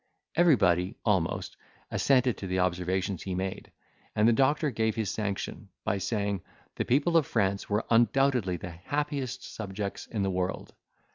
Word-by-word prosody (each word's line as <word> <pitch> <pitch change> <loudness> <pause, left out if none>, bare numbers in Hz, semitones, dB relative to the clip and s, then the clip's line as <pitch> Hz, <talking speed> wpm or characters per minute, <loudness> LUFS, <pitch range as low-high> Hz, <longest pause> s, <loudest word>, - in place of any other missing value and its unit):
Everybody, 100 - +4
almost, 95 -7 0 0.3
assented 130 -3 +3
to 95 - -5
the 95 0 -1
observations 90 +1 0
he 95 -2 -3
made, 95 +1 -4 0.4
and 105 +1 +4
the 120 - +6
doctor 145 +4 +2
gave 110 -1 0
his 110 -4 -1
sanction, 100 -3 -4
by 100 - 0
saying, 100 -2 -1 0.3
the - - -2
people 145 +7 +3
of 155 - +2
France 100 -3 0
were 105 +1 +1
undoubtedly 120 -4 +3
the 90 +1 -7
happiest 140 - -3
subjects 100 -1 -5
in 105 -3 -2
the 95 - 0
world. 90 0 -3
105 Hz, 150 wpm, -29 LUFS, 95-125 Hz, 0.4 s, the